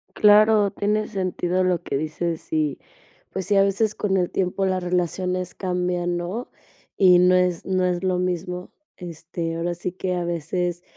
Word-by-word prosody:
Claro, 210 -1 +5
tiene 210 +1 0
sentido 185 -2 -1
lo 180 -2 +1
que 140 - -3
dices 155 +3 -3
y, 155 -3 0 0.5
pues 190 -1 -4
sí, 205 -1 +2
a 195 - +6
veces 200 +2 +1
con 195 -2 0
el 180 -2 0
tiempo 190 +1 -1
las 185 -1 0
relaciones 180 +1 -1
cambian, 180 -1 -1
¿no?, 185 +8 -4 0.5
y 180 -2 +6
no 180 +1 +5
es 180 -2 +1
no 185 -1 0
es 180 0 -1
lo 185 -1 +1
mismo, 180 0 -3 0.3
este, 165 -1 -5
ahora 170 +1 -1
sí 175 +1 -4
que 185 0 -3
a 175 - -2
veces 175 +1 -2
180 Hz, 170 wpm, -23 LUFS, 175-190 Hz, 0.5 s, a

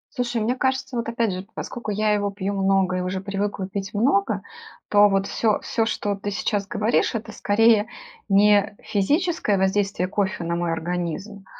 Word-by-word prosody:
Слушай, 245 -3 -1
мне 235 +4 0
кажется, 260 0 -1
вот 230 -1 -2
опять 230 -2 0
же, 185 0 -4
поскоку 240 -3 -6
я 210 +1 +1
его 205 -1 +1
пью 200 0 -3
много 195 -1 +2
и - - -1
уже 185 +1 -2
привыкла 200 0 -3
пить 195 +1 -5
много, 205 -3 +2 0.5
то 205 0 +6
вот, 195 0 +1
всё 215 +1 +1
всё, 225 -1 -1
что 205 -2 -1
ты 205 +1 -5
сейчас 200 0 -1
говоришь- 215 +3 +1
это 220 0 -4
скорее 215 +1 +3 0.4
не 205 +1 +4
физическое 285 - +1
воздействие 190 -1 +1
кофе 190 -2 -1
на 170 0 -1
мой 170 -1 -1
организм, 175 +4 -4
205 Hz, 170 wpm, -23 LUFS, 195-220 Hz, 0.5 s, то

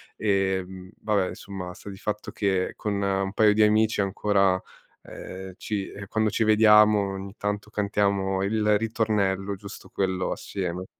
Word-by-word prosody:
e, 95 -2 +1
mhmm, 95 0 -11
vabbè, 100 -4 +1
insomma, 90 -3 -7
sta 100 - -11
di 95 - -8
fatto 105 +1 -4
che 95 -3 0
con 100 -2 -2
1 95 0 0
paio 105 -1 +5
di 110 - +5
amici 110 +1 +3
ancora, 95 -1 +2 0.4
ehm, 95 0 -9
ci 100 -3 -3
ehm, 100 - -8
quando 110 +1 +1
ci 110 - 0
vediamo 105 -2 +5
ogni 95 +1 -7
tanto 105 +1 -3
cantiamo 100 -2 0
il 105 0 +2
ritornello, 105 -3 0
giusto 100 +2 -11
quello, 95 -1 -1
assieme. 90 -1 -4
100 Hz, 155 wpm, -26 LUFS, 95-105 Hz, 0.4 s, paio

